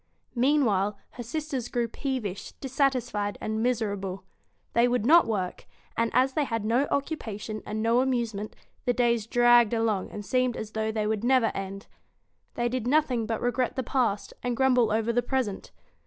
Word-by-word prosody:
Meanwhile, 235 Hz, -7 st, +2 dB
her 245 Hz, -, -8 dB
sisters 265 Hz, 0 st, -3 dB
grew 240 Hz, -1 st, -1 dB
peevish, 230 Hz, -6 st, -4 dB
dissatisfied, 250 Hz, -7 st, -1 dB
and 220 Hz, 0 st, -2 dB
miserable. 200 Hz, -6 st, -1 dB, 0.5 s
They 235 Hz, +1 st, +4 dB
would 245 Hz, -3 st, 0 dB
not 330 Hz, +6 st, +6 dB
work; 190 Hz, -5 st, -3 dB, 0.3 s
and, 230 Hz, 0 st, +1 dB
as 260 Hz, +1 st, +3 dB
they 300 Hz, -, +1 dB
had 230 Hz, -4 st, -2 dB
no 245 Hz, +6 st, +2 dB
occupation 220 Hz, -7 st, -3 dB
and 215 Hz, +1 st, -2 dB
no 230 Hz, +2 st, +3 dB
amusement, 230 Hz, -5 st, -2 dB, 0.3 s
the 245 Hz, -, +2 dB
days 235 Hz, -3 st, +1 dB
dragged 240 Hz, -1 st, +5 dB
along 220 Hz, -4 st, 0 dB
and 205 Hz, -1 st, -7 dB
seemed 255 Hz, +3 st, +1 dB
as 215 Hz, -1 st, -6 dB
though 220 Hz, 0 st, -1 dB
they 215 Hz, -1 st, -1 dB
would 215 Hz, 0 st, -1 dB
never 250 Hz, -2 st, +3 dB
end. 195 Hz, +1 st, -6 dB, 0.7 s
They 240 Hz, -, 0 dB
did 245 Hz, -1 st, -2 dB
nothing 255 Hz, -5 st, +2 dB
but 225 Hz, -1 st, -2 dB
regret 245 Hz, +1 st, 0 dB
the 260 Hz, -, -1 dB
past, 235 Hz, -6 st, -1 dB
and 245 Hz, -1 st, -2 dB
grumble 250 Hz, -4 st, +3 dB
over 225 Hz, +2 st, +1 dB
the 245 Hz, -, +2 dB
present. 245 Hz, -5 st, -2 dB
235 Hz, 170 wpm, -27 LUFS, 215-255 Hz, 0.7 s, not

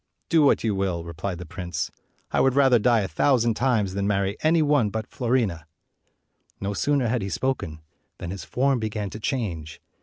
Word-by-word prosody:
"Do 165 Hz, -2 st, +4 dB
what 145 Hz, -, +4 dB
you 110 Hz, -2 st, +1 dB
will," 95 Hz, -4 st, -1 dB
replied 85 Hz, +2 st, -5 dB
the 90 Hz, -, -8 dB
prince; 85 Hz, -1 st, -4 dB, 0.4 s
"I -, -, +1 dB
216 -, -, +4 dB
would 135 Hz, -1 st, +3 dB
rather 135 Hz, -4 st, +5 dB
die 115 Hz, 0 st, +3 dB
a 95 Hz, -, -2 dB
thousand 120 Hz, -, +2 dB
times 110 Hz, -6 st, +1 dB
than 100 Hz, +1 st, -1 dB
marry 100 Hz, -1 st, 0 dB
any 160 Hz, +1 st, +3 dB
one 145 Hz, -7 st, +3 dB
but 110 Hz, +1 st, -4 dB
Fiorina." 115 Hz, -, -1 dB, 0.9 s
No 100 Hz, +1 st, -2 dB
sooner 140 Hz, +4 st, +1 dB
had 120 Hz, +1 st, 0 dB
he 95 Hz, -, -3 dB
spoken 85 Hz, -6 st, -2 dB, 0.4 s
than 90 Hz, -1 st, -6 dB
his 95 Hz, -, -6 dB
form 135 Hz, 0 st, +1 dB
began 105 Hz, -3 st, -3 dB
to 110 Hz, -, -7 dB
change. 90 Hz, -, -3 dB
105 Hz, 190 wpm, -25 LUFS, 95-130 Hz, 0.9 s, rather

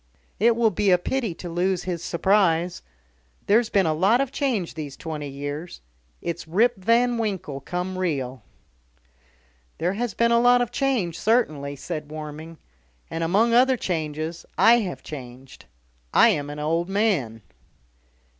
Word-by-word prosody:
"It 230 Hz, +3 st, +4 dB
will 230 Hz, -2 st, +3 dB
be 200 Hz, +2 st, +1 dB
a 180 Hz, -, +6 dB
pity 225 Hz, 0 st, -2 dB
to 175 Hz, -, -8 dB
lose 175 Hz, +1 st, -1 dB
his 175 Hz, -2 st, -4 dB
surprise. 180 Hz, -2 st, +1 dB, 0.6 s
There's 225 Hz, +2 st, +3 dB
been 195 Hz, -2 st, +2 dB
a 160 Hz, -, +2 dB
lot 195 Hz, +10 st, +3 dB
of 275 Hz, -1 st, -1 dB
change 250 Hz, -, -1 dB
these 150 Hz, -4 st, -7 dB
twenty 155 Hz, -3 st, -5 dB
years. 145 Hz, +5 st, -6 dB, 0.4 s
It's 170 Hz, -1 st, -4 dB
Rip 225 Hz, +9 st, +3 dB
Van 235 Hz, +5 st, +2 dB
Winkle 190 Hz, -10 st, -3 dB
come 180 Hz, +5 st, -4 dB
real." 135 Hz, -8 st, -2 dB, 1.4 s
"There 175 Hz, +3 st, 0 dB
has 235 Hz, 0 st, -3 dB
been 235 Hz, 0 st, +2 dB
a 235 Hz, -, +5 dB
lot 245 Hz, +1 st, +5 dB
of 245 Hz, -1 st, -1 dB
change 245 Hz, -, -1 dB
certainly," 155 Hz, -, +1 dB
said 150 Hz, +1 st, -6 dB
Warming. 155 Hz, +1 st, -8 dB, 0.5 s
"And, 165 Hz, 0 st, -2 dB
among 210 Hz, +8 st, +2 dB
other 255 Hz, +2 st, +5 dB
changes, 160 Hz, -2 st, -3 dB
I 235 Hz, +1 st, +6 dB
have 190 Hz, -6 st, -5 dB
changed. 130 Hz, -2 st, -10 dB, 0.5 s
I -, -, +7 dB
am 145 Hz, 0 st, -1 dB
an 145 Hz, -, -7 dB
old 165 Hz, +4 st, -1 dB
man." 175 Hz, -, 0 dB
180 Hz, 150 wpm, -24 LUFS, 155-225 Hz, 1.4 s, I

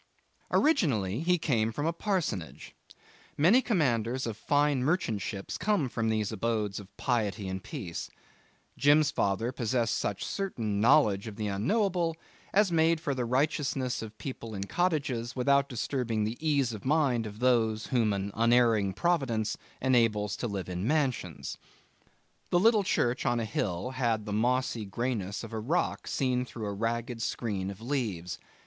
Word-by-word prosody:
Originally 130 Hz, -, +2 dB
he 180 Hz, +3 st, +2 dB
came 115 Hz, -8 st, +1 dB
from 145 Hz, +7 st, -3 dB
a 165 Hz, -, +1 dB
parsonage. 170 Hz, -, -3 dB, 0.6 s
Many 190 Hz, -, +5 dB
commanders 130 Hz, -, +1 dB
of 115 Hz, -2 st, -3 dB
fine 145 Hz, +2 st, +1 dB
merchant 135 Hz, -, 0 dB
ships 100 Hz, -2 st, -5 dB
come 205 Hz, -10 st, +1 dB
from 115 Hz, -1 st, -1 dB
these 110 Hz, -2 st, 0 dB
abodes 110 Hz, -2 st, -1 dB
of 100 Hz, 0 st, -14 dB
piety 110 Hz, -5 st, -1 dB
and 95 Hz, 0 st, -4 dB
peace. 100 Hz, -, -6 dB, 0.7 s
Jim's 145 Hz, +1 st, +4 dB
father 115 Hz, +2 st, 0 dB
possessed 115 Hz, -2 st, 0 dB
such 100 Hz, -, -2 dB
certain 115 Hz, -, -2 dB
knowledge 115 Hz, -5 st, +4 dB
of 105 Hz, -, -7 dB
the 105 Hz, -, -3 dB
Unknowable 170 Hz, -, 0 dB, 0.3 s
as 205 Hz, -2 st, +3 dB
made 165 Hz, 0 st, +3 dB
for 155 Hz, -4 st, -2 dB
the 125 Hz, -2 st, -2 dB
righteousness 130 Hz, 0 st, 0 dB
of 110 Hz, -1 st, -8 dB
people 115 Hz, -5 st, -6 dB
in 95 Hz, -, -3 dB
cottages 140 Hz, -, -1 dB
without 140 Hz, +2 st, +3 dB
disturbing 120 Hz, -3 st, -1 dB
the 110 Hz, +2 st, -2 dB
ease 140 Hz, -6 st, +1 dB
of 105 Hz, -, -7 dB
mind 130 Hz, -6 st, +2 dB
of 105 Hz, 0 st, -9 dB
those 115 Hz, -2 st, +2 dB
whom 115 Hz, -5 st, +1 dB
an 100 Hz, 0 st, -2 dB
unerring 115 Hz, -4 st, +3 dB
Providence 125 Hz, -, 0 dB, 0.3 s
enables 115 Hz, -5 st, +2 dB
to 120 Hz, -, -2 dB
live 100 Hz, -4 st, -4 dB
in 90 Hz, +3 st, -3 dB
mansions. 130 Hz, -, -1 dB, 0.9 s
The 175 Hz, -, +3 dB
little 220 Hz, +2 st, +5 dB
church 120 Hz, -8 st, +1 dB
on 120 Hz, -2 st, +1 dB
a 115 Hz, -, -1 dB
hill 100 Hz, +2 st, -2 dB
had 120 Hz, -5 st, 0 dB
the 105 Hz, -, -4 dB
mossy 120 Hz, +1 st, +1 dB
greyness 100 Hz, -1 st, -3 dB
of -, -, -8 dB
a 110 Hz, -, -2 dB
rock 145 Hz, +11 st, -1 dB
seen 125 Hz, -2 st, 0 dB
through 120 Hz, -3 st, -7 dB
a 100 Hz, -, -3 dB
ragged 115 Hz, +3 st, -2 dB
screen 100 Hz, -4 st, -2 dB
of 100 Hz, +1 st, -8 dB
leaves. 110 Hz, -10 st, -3 dB
120 Hz, 155 wpm, -29 LUFS, 105-145 Hz, 0.9 s, Many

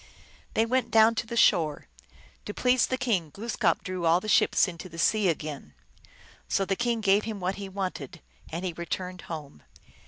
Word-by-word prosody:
They 225 Hz, -, +3 dB
went 255 Hz, +2 st, 0 dB
down 220 Hz, 0 st, +5 dB
to 225 Hz, +1 st, -3 dB
the 235 Hz, -, -4 dB
shore; 160 Hz, -9 st, +3 dB, 0.6 s
to 205 Hz, -, -6 dB
please 250 Hz, -1 st, +3 dB
the 255 Hz, -, -1 dB
king 215 Hz, -, 0 dB
Glooskap 205 Hz, -1 st, -1 dB
drew 185 Hz, -2 st, -2 dB
all 165 Hz, +2 st, +5 dB
the 215 Hz, -, -8 dB
ships 215 Hz, -1 st, +4 dB
into 180 Hz, +1 st, -8 dB
the 165 Hz, -, -11 dB
sea 210 Hz, +4 st, +2 dB
again. 150 Hz, -, -5 dB, 0.7 s
So 195 Hz, -, +1 dB
the 195 Hz, -, 0 dB
king 235 Hz, +1 st, -1 dB
gave 200 Hz, 0 st, +3 dB
him 220 Hz, -2 st, -4 dB
what 185 Hz, +1 st, -2 dB
he 195 Hz, -, -6 dB
wanted, 185 Hz, -8 st, -5 dB, 0.3 s
and 170 Hz, +3 st, -4 dB
he 180 Hz, -, -2 dB
returned 180 Hz, +2 st, -5 dB
home. 150 Hz, -, -7 dB
190 Hz, 185 wpm, -27 LUFS, 170-220 Hz, 0.7 s, down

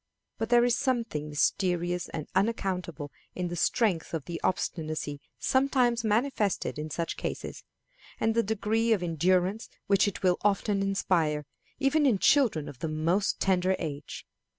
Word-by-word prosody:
But 225 Hz, -, -2 dB
there 240 Hz, 0 st, +5 dB
is 245 Hz, -1 st, +3 dB
something 230 Hz, -, -1 dB
mysterious 175 Hz, +3 st, 0 dB
and 155 Hz, -2 st, -5 dB
unaccountable 185 Hz, -7 st, -1 dB, 0.2 s
in 180 Hz, -1 st, -2 dB
the 175 Hz, -, -4 dB
strength 175 Hz, -3 st, +1 dB
of 155 Hz, -, -4 dB
the 170 Hz, -1 st, -5 dB
obstinacy 155 Hz, -5 st, -2 dB, 0.2 s
sometimes 255 Hz, -3 st, +2 dB
manifested 215 Hz, -, 0 dB
in 155 Hz, +1 st, -4 dB
such 165 Hz, +2 st, -3 dB
cases, -, -, -5 dB, 0.6 s
and 225 Hz, -, +2 dB
the 230 Hz, -, +3 dB
degree 220 Hz, +1 st, +1 dB
of 195 Hz, -5 st, -1 dB
endurance 180 Hz, +5 st, +1 dB, 0.2 s
which 200 Hz, 0 st, +3 dB
it 200 Hz, -, -4 dB
will 180 Hz, -1 st, +3 dB
often 205 Hz, 0 st, +1 dB
inspire, 170 Hz, -6 st, +1 dB, 0.3 s
even 290 Hz, +1 st, +3 dB
in 230 Hz, -6 st, +3 dB
children 235 Hz, -, +3 dB
of 130 Hz, -, -10 dB
the 160 Hz, -, -3 dB
most 165 Hz, +6 st, 0 dB
tender 190 Hz, 0 st, +2 dB
age. 145 Hz, -4 st, -6 dB
190 Hz, 150 wpm, -28 LUFS, 165-225 Hz, 0.6 s, there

